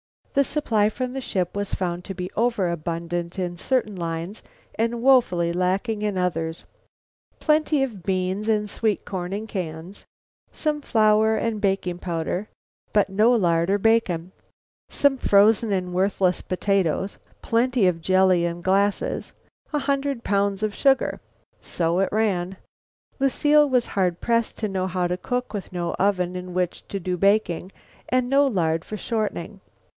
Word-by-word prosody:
The 280 - +4
supply 225 -7 +1
from 250 +3 -4
the 270 - -4
ship 185 -7 -2
was 205 -1 -2
found 175 -1 -3
to 195 - -6
be 180 0 -5
over 225 -6 +1
abundant 170 +1 -4
in 175 -2 -3
certain 225 0 0
lines 170 +3 -4 0.3
and 230 +1 -1
woefully 180 -11 +4
lacking 195 +5 0
in 210 -2 -1
others: 165 -2 -2 0.8
plenty 305 -2 +2
of 225 -8 -5
beans 185 +3 -1
and 210 -1 +1
sweet 215 0 -1
corn 180 -2 -4
in 210 +2 -3
cans, 180 -2 -6 0.5
some 300 -1 -2
flour 220 -3 +3
and 220 -1 -2
baking 190 -3 0
powder 175 +3 -3 0.5
but 205 -1 +3
no 210 +5 +4
lard 170 -6 +2
or 200 - +3
bacon; 195 -5 +1 0.6
some 280 -1 +2
frozen 215 0 +4
and 180 -2 -1
worthless 185 -1 +1
potatoes; 190 0 -1 0.2
plenty 240 -1 +2
of 175 -2 +1
jelly 185 -1 +3
in 170 0 -3
glasses; 195 +3 0 0.4
a 300 - 0
hundred 275 -2 -1
pounds 200 0 0
of 215 -1 0
sugar. 270 +2 +2 0.4
So 170 +1 0
it 195 - +2
ran. 195 -4 0 0.6
Lucile 295 +2 +4
was 250 -2 +2
hard 180 -3 0
pressed 230 -1 0
to 215 - -1
know 190 -1 -1
how 180 -1 -1
to 180 +1 -2
cook 250 +5 -3
with 195 -3 -6
no 175 -1 -2
oven 185 -2 +1
in 180 0 -6
which 180 -1 -2
to 195 - -4
do 180 0 -2
baking 195 -2 +1 0.4
and 255 0 +2
with 250 - -7
no 280 +1 +5
lard 165 -8 0
for 215 - -6
shortening. 210 -3 -3
195 Hz, 155 wpm, -24 LUFS, 180-225 Hz, 0.8 s, no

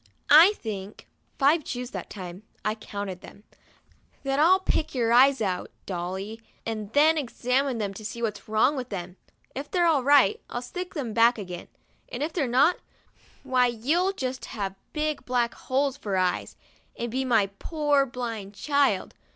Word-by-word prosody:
'I 330 +7 +9
think' 205 - -7 0.3
(five 300 +3 +4
chews 250 -1 -5
that - - -6
time, 185 -2 -8 0.2
I 215 - +2
counted 200 -4 -6
them) 205 - -14 0.8
"that 275 0 0
I'll 360 +5 +6
pick 320 -6 -1
your 235 -2 +2
eyes 265 +1 +6
out, 185 -4 -1 0.2
Dolly, 190 +4 -5 0.2
and 215 -2 -4
then 310 +2 +5
examine 255 0 0
them 205 -3 -2
to 215 - -10
see 220 +2 -6
what's 215 -2 -3
wrong 220 +7 +3
with 255 -2 -5
them. 180 -2 -6 0.4
If 280 +2 -6
they're 350 -2 +2
all 315 -5 +4
right, 275 -6 +5
111 240 - -4
stick 360 +8 -6
them 250 -8 -3
back 235 +2 +5
again, 180 -4 -7 0.4
and - - -3
if 315 - -3
they're 300 -7 0
not, 280 +9 +4 0.7
why 255 -2 +3
you'll 300 - +1
just 260 -6 -4
have 195 -3 -4 0.2
big 305 -1 -2
black 245 -2 0
holes 270 +1 -1
for 200 -8 -2
eyes, 185 -1 0 0.4
and 235 -1 -3
be 260 +2 -1
my 225 -6 +2
poor 295 -4 +1
blind 230 -5 -5
child. 285 +5 +1
245 Hz, 165 wpm, -26 LUFS, 210-285 Hz, 0.8 s, I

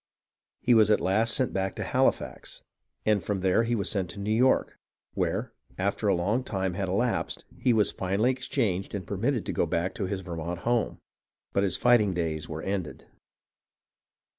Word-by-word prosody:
He 125 - +4
was 110 -2 +6
at 105 - +4
last 110 +6 +2
sent 130 -3 +1
back 95 -1 -1
to - - -3
Halifax, - - -1 0.4
and 105 -4 +2
from 100 0 -2
there 95 +3 +3 0.2
was 100 - -1
sent 95 -4 -1
to 100 - -8
New 105 +2 -1
York, 125 +3 +2 0.3
where, - - -1 0.2
after 100 +2 -1
a 100 - +4
long 105 +9 0
time 95 -6 -2
had 95 +1 -2
elapsed, 115 +6 -1
he 125 - +1
was 110 -3 +3
finally 100 +7 +1
exchanged 105 -7 -2
and 95 -3 -4
permitted 115 +6 -1
to - - -3
go - - +1
back 85 +3 -1
to 95 - -3
his 95 0 -3
Vermont 85 -1 -5
home; 120 -2 0 0.6
but 100 - +2
his 95 -3 +1
fighting 110 -6 +4
days 80 -3 -2
were 80 0 -5
ended. 95 -5 -4
100 Hz, 175 wpm, -28 LUFS, 90-110 Hz, 0.6 s, was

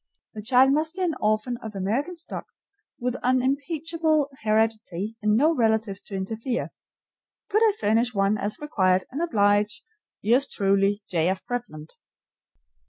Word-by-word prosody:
The 215 - -6
child 255 +4 +4
must 315 +3 0
be 380 - -2
an 340 -3 +1
orphan 215 +3 0
of 220 -3 -9
American 230 - -1
stock, 335 - -7 0.5
with 250 0 -2
unimpeachable 295 +4 0
heredity, 215 -2 0
and 210 0 +3
no 310 +6 +4
relatives 220 -5 +1
to 200 - -8
interfere. 225 +6 -3 0.8
Could 430 - +3
I 435 -2 +5
furnish 225 +4 +2
one 200 -1 +2
as 210 0 -3
required 185 - +1
and 280 +5 -3
oblige, 205 -8 +2 0.4
yours 245 +7 +3
truly, 200 +1 +1
J. 170 -1 +1
F. 190 0 -3
Bretland? 235 - -5
225 Hz, 140 wpm, -25 LUFS, 205-275 Hz, 0.8 s, I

